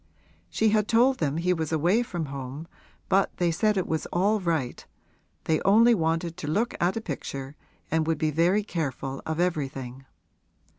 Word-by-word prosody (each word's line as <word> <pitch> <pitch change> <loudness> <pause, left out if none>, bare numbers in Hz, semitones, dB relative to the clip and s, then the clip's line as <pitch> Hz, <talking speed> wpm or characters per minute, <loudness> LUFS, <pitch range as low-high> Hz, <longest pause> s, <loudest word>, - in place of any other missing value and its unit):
She 220 - +2
had 210 -1 +2
told 250 +3 +3
them 150 -1 0
he 180 +2 +1
was 160 -3 -3
away 175 +8 +2
from 175 -9 -4
home 140 +2 -7 0.4
but 195 0 +1
they 175 -1 +2
said 210 +5 +1
it 185 - 0
was 160 -1 -2
all 205 +5 +1
right; 160 -9 -2 0.6
they 160 -1 +1
only 230 +4 +5
wanted 165 -2 -1
to 160 - -6
look 215 +10 0
at 180 +5 +1
a - - -2
picture 140 -5 -6 0.4
and 160 0 +1
would 165 - +1
be 155 -1 0
very 175 +7 +2
careful 135 - -4
of 160 +1 -2
everything. 135 -7 -2
165 Hz, 170 wpm, -26 LUFS, 150-195 Hz, 0.6 s, only